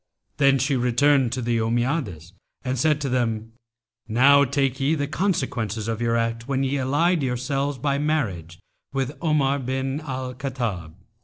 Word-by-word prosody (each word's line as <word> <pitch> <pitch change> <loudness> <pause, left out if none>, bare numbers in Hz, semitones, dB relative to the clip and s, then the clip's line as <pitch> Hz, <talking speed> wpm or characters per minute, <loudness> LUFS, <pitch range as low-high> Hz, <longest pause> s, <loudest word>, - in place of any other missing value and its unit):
Then 140 -1 +4
she 135 +2 +1
returned 125 +1 +3
to 125 -1 -3
the 115 0 0
Ommiades 115 - -2 0.3
and 130 -1 -2
said 150 +1 +2
to 140 - -1
them, 115 -3 -1 0.6
'Now 135 +5 +5
take 135 0 0
ye 140 +4 +2
the 145 -2 -1
consequences 135 - -1
of 115 0 -3
your 115 0 +1
act 115 +1 -2
when 135 -1 0
ye 135 +1 0
allied 150 +6 +2
yourselves 135 +2 -1
by 140 +2 0
marriage 100 - -2 0.4
with 135 +1 -2
Omar 145 -4 +2
bin 130 +2 -2
al 130 -3 -5
Khattab.' 120 - -4
130 Hz, 155 wpm, -24 LUFS, 115-140 Hz, 0.6 s, Now